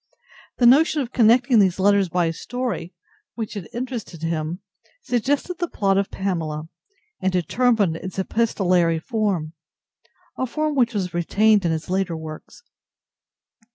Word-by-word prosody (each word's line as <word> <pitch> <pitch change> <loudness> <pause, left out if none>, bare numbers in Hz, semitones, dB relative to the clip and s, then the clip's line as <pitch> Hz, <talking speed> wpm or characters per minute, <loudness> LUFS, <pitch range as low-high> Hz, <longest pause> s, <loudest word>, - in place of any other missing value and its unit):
The 245 - +3
notion 295 +5 +5
of 245 - -9
connecting 240 +1 +4
these 190 -3 +3
letters 200 -1 +3
by 175 +1 +1
a 165 - -1
story 245 -2 -4 0.4
which 225 -3 -5
had 200 -6 -7
interested 235 - -6
him 165 +2 -2 0.4
suggested 285 - -1
the 345 - -1
plot 195 -8 +1
of 200 - -1
"Pamela"; 160 -5 -3 0.5
and 190 - +1
determined 195 0 +1
its 185 +3 -8
epistolary 185 -5 +1
form—a 175 +4 -5
form 305 +5 -1
which 245 -4 +1
was 185 -3 -2
retained 200 +4 +3
in 170 - +2
his 160 0 -3
later 185 -2 -1
works. 155 - -10
195 Hz, 135 wpm, -22 LUFS, 170-240 Hz, 0.5 s, notion